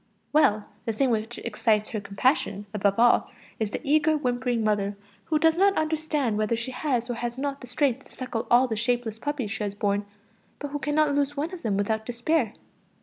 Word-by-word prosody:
Well 215 Hz, -9 st, +4 dB, 0.2 s
the 225 Hz, -, -1 dB
thing 260 Hz, +3 st, +2 dB
which 225 Hz, +1 st, -2 dB
excites 215 Hz, -1 st, 0 dB
her 215 Hz, -, -3 dB
compassion 205 Hz, -, 0 dB
above 200 Hz, -1 st, +1 dB
all 240 Hz, +1 st, +4 dB, 0.3 s
is 220 Hz, -2 st, 0 dB
the -, -, -4 dB
eager, 305 Hz, +2 st, +3 dB
whimpering 245 Hz, -3 st, 0 dB
mother, 205 Hz, -1 st, 0 dB, 0.3 s
who 310 Hz, -, +1 dB
does 320 Hz, +1 st, +3 dB
not 395 Hz, 0 st, +4 dB
understand 305 Hz, -7 st, 0 dB
whether 215 Hz, +2 st, +1 dB
she 235 Hz, +3 st, -4 dB
has 250 Hz, -3 st, -1 dB
or 245 Hz, -, -2 dB
has 240 Hz, +1 st, -4 dB
not 280 Hz, 0 st, -3 dB
the 250 Hz, -, -9 dB
strength 265 Hz, +1 st, 0 dB
to -, -, -14 dB
suckle 255 Hz, -3 st, -4 dB
all 245 Hz, +2 st, +5 dB
the 225 Hz, -, -2 dB
shapeless 235 Hz, -1 st, -1 dB
puppies 280 Hz, -7 st, -3 dB
she 220 Hz, 0 st, -3 dB
has 200 Hz, -1 st, -3 dB
borne, 205 Hz, 0 st, 0 dB, 0.5 s
but 290 Hz, -, -5 dB
who 290 Hz, +1 st, -3 dB
cannot 295 Hz, 0 st, +2 dB
lose 285 Hz, 0 st, 0 dB
one 315 Hz, +6 st, -2 dB
of 360 Hz, -, -7 dB
them 205 Hz, -4 st, 0 dB
without 220 Hz, +2 st, -1 dB
despair. 245 Hz, 0 st, 0 dB
240 Hz, 205 wpm, -26 LUFS, 215-290 Hz, 0.5 s, all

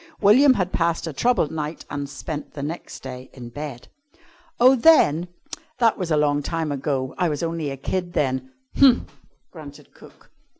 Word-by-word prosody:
William 255 Hz, +7 st, +6 dB
had 185 Hz, -3 st, -2 dB
passed 170 Hz, 0 st, 0 dB
a 160 Hz, -, -5 dB
troubled 235 Hz, -, +1 dB
night 155 Hz, 0 st, -5 dB
and 145 Hz, -1 st, -5 dB
spent 145 Hz, +2 st, -7 dB
the 140 Hz, -, -5 dB
next 160 Hz, +4 st, -7 dB
day 130 Hz, -1 st, -8 dB
in 120 Hz, -3 st, -9 dB
bed. 140 Hz, -1 st, -8 dB, 0.7 s
"Oh, 255 Hz, +2 st, +7 dB
then! 205 Hz, -, +4 dB, 0.5 s
That 230 Hz, -2 st, +3 dB
was 180 Hz, -4 st, -4 dB
a 155 Hz, -, +2 dB
long 145 Hz, -1 st, +2 dB
time 160 Hz, 0 st, -3 dB
ago. 135 Hz, -2 st, -2 dB
I 180 Hz, -2 st, +2 dB
was 150 Hz, +1 st, -3 dB
only 165 Hz, -3 st, -2 dB
a 135 Hz, -, -6 dB
kid 175 Hz, +6 st, -3 dB
then." 130 Hz, -2 st, -1 dB, 0.3 s
"Umph!" 265 Hz, -3 st, +4 dB, 0.4 s
grunted 145 Hz, -3 st, -12 dB
cook. -, -, -18 dB
155 Hz, 170 wpm, -23 LUFS, 140-180 Hz, 0.7 s, Oh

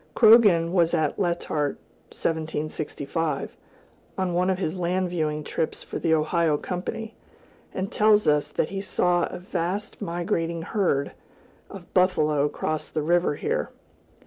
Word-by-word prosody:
Croghan 205 Hz, -8 st, +6 dB
was 170 Hz, -2 st, +3 dB
at 155 Hz, -3 st, 0 dB
Letart 170 Hz, -5 st, -1 dB, 0.3 s
(1765), 155 Hz, -1 st, -3 dB, 0.6 s
on 185 Hz, -2 st, -1 dB
one 180 Hz, +2 st, +2 dB
of 190 Hz, -, +1 dB
his 185 Hz, -2 st, -2 dB
land 180 Hz, 0 st, -1 dB
viewing 155 Hz, -3 st, -1 dB
trips 160 Hz, -, -3 dB
for -, -, -5 dB
the 165 Hz, -, 0 dB
Ohio 160 Hz, 0 st, +2 dB
Company, 205 Hz, +7 st, -5 dB, 0.6 s
and 190 Hz, +1 st, -4 dB
tells 210 Hz, 0 st, +4 dB
us 150 Hz, -1 st, +3 dB
that -, -, -1 dB
he 195 Hz, 0 st, -4 dB
saw 180 Hz, -3 st, +1 dB
a -, -, -6 dB
"vast 180 Hz, +4 st, -4 dB
migrating 170 Hz, -2 st, -2 dB
herd" 175 Hz, -8 st, 0 dB, 0.6 s
of 190 Hz, -3 st, -12 dB
buffalo 155 Hz, -6 st, +3 dB
cross 155 Hz, +1 st, -3 dB
the 155 Hz, -, -2 dB
river 175 Hz, -1 st, +2 dB
here. 475 Hz, -, -2 dB
170 Hz, 135 wpm, -25 LUFS, 155-185 Hz, 0.6 s, Croghan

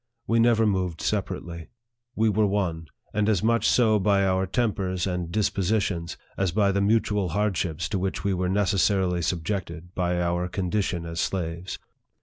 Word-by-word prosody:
We 115 Hz, +1 st, +2 dB
never 115 Hz, -1 st, +4 dB
moved 90 Hz, -5 st, 0 dB
separately. 90 Hz, -5 st, -3 dB, 0.5 s
We 110 Hz, +1 st, +2 dB
were 105 Hz, 0 st, +3 dB
one; 85 Hz, -5 st, -1 dB, 0.3 s
and 105 Hz, 0 st, +1 dB
as 105 Hz, -3 st, +1 dB
much 115 Hz, +1 st, +3 dB
so 110 Hz, -4 st, +4 dB
by 100 Hz, 0 st, +3 dB
our 95 Hz, 0 st, +1 dB
tempers 95 Hz, -4 st, -1 dB
and 90 Hz, -3 st, -3 dB
dispositions, 100 Hz, -3 st, 0 dB, 0.2 s
as 95 Hz, -3 st, +1 dB
by 100 Hz, +1 st, +2 dB
the 100 Hz, +1 st, 0 dB
mutual 105 Hz, -2 st, +1 dB
hardships 90 Hz, -5 st, -1 dB
to 100 Hz, -, -1 dB
which 95 Hz, +1 st, -2 dB
we 100 Hz, -1 st, +1 dB
were 90 Hz, 0 st, -1 dB
necessarily 95 Hz, -2 st, +2 dB
sub 85 Hz, 0 st, -1 dB
jected 90 Hz, -3 st, -4 dB
by 90 Hz, -1 st, 0 dB
our 85 Hz, +1 st, 0 dB
condition 90 Hz, -1 st, -2 dB
as 85 Hz, 0 st, -5 dB
slaves. 85 Hz, 0 st, -3 dB
95 Hz, 160 wpm, -25 LUFS, 90-105 Hz, 0.5 s, never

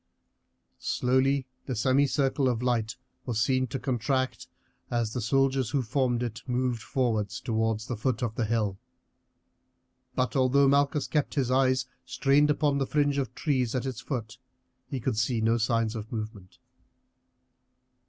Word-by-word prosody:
Slowly 130 Hz, +2 st, +1 dB, 0.2 s
the 130 Hz, -, -2 dB
semicircle 135 Hz, +3 st, +2 dB
of 120 Hz, -1 st, -1 dB
light 115 Hz, -2 st, 0 dB, 0.3 s
was 115 Hz, -3 st, -1 dB
seen 130 Hz, +2 st, +2 dB
to 135 Hz, +3 st, -3 dB
contract 130 Hz, 0 st, -1 dB, 0.4 s
as 115 Hz, -2 st, -1 dB
the 125 Hz, -, -2 dB
soldiers 135 Hz, +1 st, +2 dB
who 135 Hz, +1 st, 0 dB
formed 125 Hz, 0 st, 0 dB
it 115 Hz, -1 st, -4 dB
moved 125 Hz, -2 st, 0 dB
forward 110 Hz, -5 st, 0 dB
towards 110 Hz, 0 st, -1 dB
the 125 Hz, -, -3 dB
foot 115 Hz, +2 st, -1 dB
of 115 Hz, -2 st, -1 dB
the 115 Hz, 0 st, -1 dB
hill; 105 Hz, -3 st, -1 dB, 1.4 s
but 125 Hz, +2 st, 0 dB
although 135 Hz, +1 st, +4 dB
Malchus 140 Hz, +1 st, +2 dB
kept 150 Hz, -2 st, -1 dB
his 130 Hz, -4 st, +1 dB
eyes 130 Hz, -1 st, +3 dB, 0.2 s
strained 140 Hz, +2 st, +3 dB
upon 145 Hz, -1 st, +2 dB
the 135 Hz, -, 0 dB
fringe 145 Hz, -1 st, +1 dB
of 135 Hz, -, -3 dB
trees 130 Hz, -6 st, 0 dB
at 130 Hz, -, -1 dB
its 130 Hz, -2 st, -4 dB
foot, 125 Hz, -3 st, -5 dB, 0.5 s
he 135 Hz, -, -4 dB
could 120 Hz, -2 st, -1 dB
see 120 Hz, 0 st, +1 dB
no 115 Hz, +1 st, +2 dB
signs 115 Hz, 0 st, +1 dB
of 110 Hz, -1 st, -6 dB
movement. 110 Hz, -5 st, -6 dB
125 Hz, 150 wpm, -28 LUFS, 115-135 Hz, 1.4 s, although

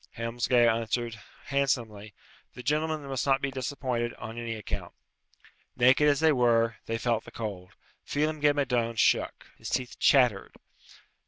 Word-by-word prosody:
Helmsgail 120 Hz, +1 st, +2 dB
answered, 115 Hz, 0 st, -1 dB, 0.2 s
handsomely, 115 Hz, -7 st, -1 dB, 0.4 s
"The 125 Hz, -, -9 dB
gentlemen 155 Hz, +2 st, -1 dB
must 135 Hz, -1 st, -3 dB
not 135 Hz, -1 st, +3 dB
be 140 Hz, -, -2 dB
disappointed, 130 Hz, -2 st, -3 dB
on 110 Hz, -, -8 dB
any 115 Hz, -1 st, -4 dB
account." 105 Hz, -, -6 dB, 0.8 s
Naked 130 Hz, +4 st, +5 dB
as 145 Hz, -, +2 dB
they 160 Hz, -1 st, +5 dB
were, 115 Hz, -3 st, +2 dB
they 115 Hz, -, -1 dB
felt 115 Hz, -1 st, 0 dB
the -, -, -12 dB
cold. 100 Hz, -5 st, -7 dB, 0.3 s
Phelem 155 Hz, +1 st, -1 dB
ghe 145 Hz, 0 st, +5 dB
Madone 120 Hz, -5 st, -1 dB
shook. -, -, +1 dB
His -, -, -6 dB
teeth 125 Hz, -1 st, -3 dB
chattered. 125 Hz, -8 st, +3 dB
Dr. -, -, -22 dB
120 Hz, 150 wpm, -28 LUFS, 115-140 Hz, 0.8 s, Naked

